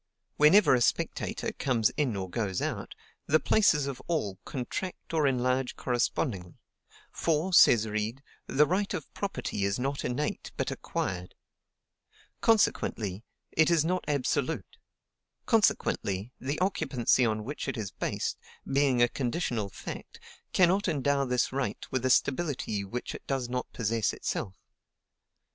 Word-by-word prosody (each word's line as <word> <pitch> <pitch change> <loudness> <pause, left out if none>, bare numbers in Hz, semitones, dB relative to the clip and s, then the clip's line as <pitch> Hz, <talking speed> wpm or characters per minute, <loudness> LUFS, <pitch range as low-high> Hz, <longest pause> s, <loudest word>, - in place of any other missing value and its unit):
Whenever 165 +6 +6
a 125 - +3
spectator - - 0
comes 120 -5 +1
in 135 -7 -1
or 95 -1 -3
goes 95 -1 -2
out, - - -4 0.3
the 155 +2 +4
places 165 -10 +3
of 135 -2 -5
all 105 - -1
contract 165 +8 -5
or 155 -3 +3
enlarge 130 0 0
correspondingly: 115 -7 -1 0.6
for, 165 +3 0
says 115 -9 +7
Reid, 110 +5 -3 0.2
"THE 150 +2 +4
RIGHT 195 +5 0
OF 160 - -7
PROPERTY 195 - -3
IS 100 0 +1
NOT 135 +2 -2
INNATE, 125 +5 -3
BUT - - -1
ACQUIRED;" 90 0 -4 1.1
consequently, 110 - +1 0.3
it 160 +1 +4
is 165 -3 +3
not 180 +2 0
absolute; 145 +1 -1 0.7
consequently, 115 - +1
the 140 +3 -2
occupancy 130 - +2
on 110 -2 0
which 145 +6 -5
it 135 - -2
is 105 -4 -4
based, - - -3 0.3
being 135 -3 +3
a - - +5
conditional 120 - -2
fact, - - -8 0.3
cannot 190 +2 +3
endow 140 -3 +1
this 125 0 0
right 135 0 -2
with 130 -1 -1
a 130 - +2
stability 130 -8 +1
which 120 +6 -5
it - - -10
does 135 -3 -1
not 125 0 -3
possess 115 -1 0
itself. 95 - -3
130 Hz, 135 wpm, -29 LUFS, 115-150 Hz, 1.1 s, says